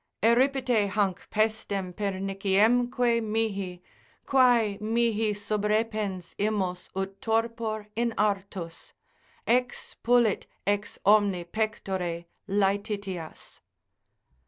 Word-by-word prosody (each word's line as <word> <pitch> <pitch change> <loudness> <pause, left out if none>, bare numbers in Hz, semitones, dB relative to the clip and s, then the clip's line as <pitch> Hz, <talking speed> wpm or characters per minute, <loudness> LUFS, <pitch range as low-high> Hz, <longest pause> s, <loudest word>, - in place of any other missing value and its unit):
Eripite 250 -2 +3
hanc 195 -2 -1
pestem 210 -4 -1
perniciemque 210 +5 +1
mihi; 200 -5 -2 0.4
Quae 240 -6 +4
mihi 225 -1 +1
subrepens 210 -2 -1
imos 195 -4 -1
ut 195 0 -4
torpor 225 -1 -1
in 235 +1 +1
artus, 195 -5 -2 0.5
Expulit 245 -2 +1 0.2
ex 205 +2 -1
omni 200 -3 +4
pectore 185 -3 -3 0.2
laetitias. 200 -3 -2
210 Hz, 75 wpm, -27 LUFS, 195-225 Hz, 0.5 s, Quae